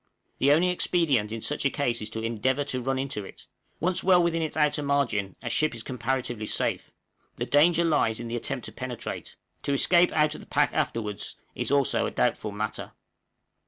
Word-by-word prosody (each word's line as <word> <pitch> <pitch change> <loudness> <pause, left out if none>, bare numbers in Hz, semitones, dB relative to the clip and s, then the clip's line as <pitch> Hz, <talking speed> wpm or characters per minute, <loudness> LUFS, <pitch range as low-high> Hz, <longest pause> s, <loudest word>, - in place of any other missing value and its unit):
The 140 +2 +4
only 170 +5 +4
expedient 155 -11 +1
in 115 0 -4
such 150 - -2
a 140 - +3
case 120 -5 -1
is 105 - -4
to 110 0 -5
endeavor 120 +5 0
to 130 -3 -2
run 135 +2 -1
into 135 -5 -3
it 95 - -12 0.3
once 180 +2 0
well 180 -1 +5
within 165 -1 0
its 160 0 -2
outer 150 -1 +2
margin 125 -9 0
a 120 - -3
ship 155 +2 +1
is 115 - -8
comparatively 120 -3 -3
safe - - 0 0.4
the - - -3
danger 170 +4 +4
lies 115 -9 +2
in 120 - -5
the 115 - -3
attempt 125 +1 -2
to - - -6
penetrate; 125 -2 -6 0.3
to 140 - -1
escape 175 +5 +4
out 150 -1 +3
of - - -8
the - - -14
pack - - +2
afterwards 105 -3 -2 0.2
is - - -3
also 140 -1 +2
a - - -2
doubtful 105 - 0
matter. 105 +1 -4
135 Hz, 195 wpm, -27 LUFS, 115-150 Hz, 0.4 s, well